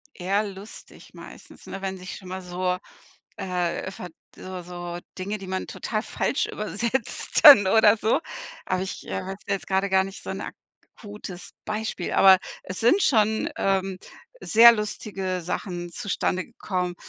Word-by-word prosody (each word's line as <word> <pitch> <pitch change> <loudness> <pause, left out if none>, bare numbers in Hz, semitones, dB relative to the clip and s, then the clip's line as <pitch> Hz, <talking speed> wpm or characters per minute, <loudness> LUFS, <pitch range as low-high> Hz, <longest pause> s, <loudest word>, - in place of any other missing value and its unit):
Eher 195 +3 0
lustig 200 +1 -11
meistens, - - -13
ne, 195 - -7
wenn 190 -1 -3
sich 185 0 -8
schon 190 - -12
mal 185 +1 -5
so, 180 0 -2 0.6
äh, 180 0 -2
ver 180 - -8 0.3
so 185 -1 -8
so 175 0 -7 0.2
Dinge, 200 +3 -3
die 195 - -9
man 185 0 -3
total 215 -1 -3
falsch 280 - -1
übersetzt 220 +3 -2
dann 225 -10 +11
oder 220 +1 +6
so. 220 +8 +1 0.5
Aber 185 0 0
ich, 190 - -6
äh, - - -3
wüsste 195 +1 -5
jetzt 195 - -3
gerade 195 +1 +1
gar 190 0 +4
nicht 195 0 -9
so - - -5
'n - - -4 0.6
akutes 205 -4 -9
Beispiel, 215 -4 -3
aber 190 -1 +7 0.3
es 185 - -6
sind 300 - +4
schon, 220 -3 +2
ähm, 195 -1 0 0.4
sehr 235 +1 +8
lustige 195 -4 -3
Sachen 175 0 -4
zustande 185 -1 -2
gekommen, 180 -6 -3
190 Hz, 155 wpm, -25 LUFS, 185-210 Hz, 0.6 s, dann